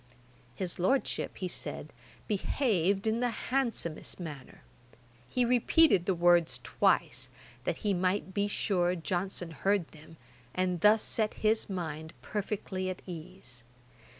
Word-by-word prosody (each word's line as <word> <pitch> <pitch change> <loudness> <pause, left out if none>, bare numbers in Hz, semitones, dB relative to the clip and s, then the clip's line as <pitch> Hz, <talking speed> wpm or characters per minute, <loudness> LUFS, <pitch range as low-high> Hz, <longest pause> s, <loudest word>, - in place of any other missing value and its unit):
His 180 -2 -3
Lordship, 260 +10 0
he 185 - -2
said, - - -5 0.3
behaved 200 - +1
in 220 +1 +1
the 245 0 +1
handsomest 230 -11 -1
manner. 150 - -8 0.7
He 250 -1 +2
repeated 245 - +4
the 190 - +2
words 175 -1 +4
twice, - - +1 0.4
that - - 0
he 205 - +3
might 190 +1 0
be 200 +1 +1
sure 180 -3 +1
Johnson 175 0 -3
heard 195 +3 0
them, 160 +1 -15 0.4
and 180 -2 0
thus 210 +1 +6
set 215 -2 0
his 220 0 +2
mind 160 -4 -4
perfectly 195 -2 -3
at 185 - -6
ease. 165 -8 -10
185 Hz, 125 wpm, -31 LUFS, 175-210 Hz, 0.7 s, thus